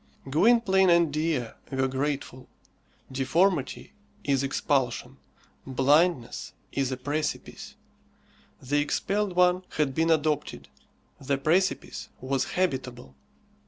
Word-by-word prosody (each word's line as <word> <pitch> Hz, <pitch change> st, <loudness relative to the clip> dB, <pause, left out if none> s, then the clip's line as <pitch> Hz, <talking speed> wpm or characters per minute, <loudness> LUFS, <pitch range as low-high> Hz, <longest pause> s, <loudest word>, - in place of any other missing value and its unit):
Gwynplaine 190 Hz, -, +4 dB
and 170 Hz, -3 st, +4 dB
Dea 155 Hz, -6 st, 0 dB, 0.2 s
were 135 Hz, 0 st, +1 dB
grateful. 135 Hz, -1 st, -3 dB, 0.6 s
Deformity 145 Hz, +6 st, 0 dB, 0.3 s
is 140 Hz, -2 st, +1 dB
expulsion. 135 Hz, -2 st, -1 dB, 0.5 s
Blindness 140 Hz, +1 st, +1 dB, 0.2 s
is 135 Hz, -1 st, -1 dB
a 130 Hz, -, -2 dB
precipice. 145 Hz, +4 st, -4 dB, 0.8 s
The 145 Hz, +3 st, 0 dB
expelled 195 Hz, +6 st, -1 dB
one 180 Hz, 0 st, +3 dB
had 150 Hz, -3 st, +1 dB
been 160 Hz, +4 st, +1 dB
adopted; 155 Hz, -2 st, 0 dB, 0.5 s
the 140 Hz, +1 st, 0 dB
precipice 175 Hz, +7 st, 0 dB
was 130 Hz, 0 st, -1 dB
habitable. 130 Hz, -, -2 dB
145 Hz, 95 wpm, -27 LUFS, 130-170 Hz, 0.8 s, Gwynplaine